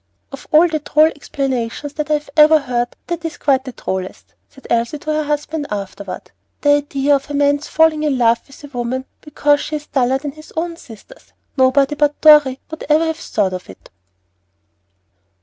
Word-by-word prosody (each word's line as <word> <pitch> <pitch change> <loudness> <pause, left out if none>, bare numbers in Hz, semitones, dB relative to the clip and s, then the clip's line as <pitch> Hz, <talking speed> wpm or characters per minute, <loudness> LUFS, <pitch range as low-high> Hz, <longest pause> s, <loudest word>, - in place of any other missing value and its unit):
"Of 275 -1 -10
all 315 +3 +6
the 315 -2 -2
droll 305 +1 +3
explanations 275 -2 -3
that 300 0 -4
I 300 -1 +2 0.2
ever 310 0 +7
heard, 245 -4 -2
that 345 -1 -4
is 325 -2 -5
quite 270 -2 +1
the 260 - -6
drollest," 190 -5 -6 0.2
said 270 - -19
Elsie 235 +5 0
to 305 +1 -3
her 305 0 -1
husband 295 0 -3
afterward. 200 -2 -6 0.3
"The 290 - +2
idea 285 0 0
of 275 - -13
a 290 - -3
man's 285 0 +1
falling 320 -1 +3
in 295 -3 0
love 235 -1 +3
with 275 +1 -16
a - - -8
woman 245 +2 -3 0.2
because 290 -1 +1
she's 300 0 -5
duller 260 -2 +1
than 285 +1 -6
his 310 +2 -15
own 335 +1 -2
sisters! 250 - -15 0.2
Nobody 270 +2 +3
but 295 0 0
Dorry 295 -4 +6
would 315 - -7
ever 310 +2 +4
have 320 -1 -2
thought 205 - -1
of 180 - -7
it." 95 - -15
290 Hz, 185 wpm, -18 LUFS, 255-305 Hz, 0.3 s, ever